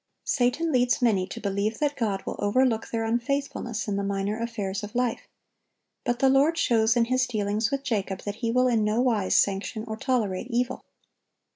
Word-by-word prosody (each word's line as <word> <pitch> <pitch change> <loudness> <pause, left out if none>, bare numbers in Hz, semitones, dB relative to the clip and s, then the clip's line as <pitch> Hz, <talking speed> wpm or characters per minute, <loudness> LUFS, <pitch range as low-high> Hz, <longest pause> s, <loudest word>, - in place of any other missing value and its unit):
Satan 285 +6 +1
leads 245 -2 +2
many 205 -7 +2
to 230 - -7
believe 205 +1 -1
that 290 -1 0
God 210 -5 -2
will - - -4
overlook 225 +2 +2
their 225 -1 -2
unfaithfulness 240 0 -2
in 200 -1 -1
the 200 - -1
minor 200 +2 -2
affairs 210 -4 -3
of 210 +1 -8
life; 245 -2 -1 0.8
but 240 - 0
the 270 - +3
Lord 280 +5 +4
shows 225 -7 +3
in 235 - +4
His 255 +2 +1
dealings 215 -1 0
with 275 -1 -2
Jacob 200 -7 -2
that 205 0 -5
He 230 -1 -2
will 250 +2 +3
in 230 -3 +2
no 210 +2 +1
wise 225 -6 +2
sanction 200 +3 +1
or 220 - -3
tolerate 225 -4 -1
evil. 245 +1 -1
230 Hz, 185 wpm, -26 LUFS, 205-250 Hz, 0.8 s, Lord